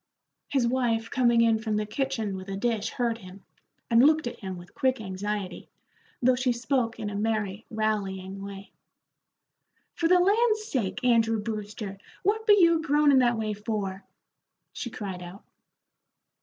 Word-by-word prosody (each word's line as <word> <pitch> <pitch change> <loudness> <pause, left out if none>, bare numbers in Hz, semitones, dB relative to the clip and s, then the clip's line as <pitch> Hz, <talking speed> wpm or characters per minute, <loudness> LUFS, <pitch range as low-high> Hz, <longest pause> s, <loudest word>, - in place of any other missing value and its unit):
His 270 -4 +1
wife 235 -2 0
coming 240 -2 +3
in 225 -1 +4
from 220 -1 -2
the 210 0 0
kitchen 225 -3 -2
with 190 +1 -8
a 195 - -3
dish 225 0 0
heard 235 -2 -1
him, 185 -1 -13 0.4
and 230 +1 +5
looked 310 +2 +4
at 240 - -5
him 190 -3 -6
with 175 0 -13
quick 260 -1 +1
anxiety, 200 -1 -4 0.5
though 255 +1 +5
she 250 0 +1
spoke 235 -1 -1
in 210 -2 -3
a - - -5
merry, 215 -1 -2
rallying 195 -3 -2
way. 200 0 -9 1.2
"For 335 - 0
the 365 +2 +6
land 430 +5 +3
sake, 255 - -3
Andrew 225 -2 +3
Brewster, 210 -2 -5 0.2
what 435 +3 0
be 415 -1 +7
you 335 -2 +5
groanin' 290 -2 +4
that 240 -2 +3
way 215 -1 -1
for?" 205 -2 -4 0.7
she 240 - -5
cried 195 -5 -6
out. 180 +3 -10
225 Hz, 155 wpm, -27 LUFS, 200-255 Hz, 1.2 s, be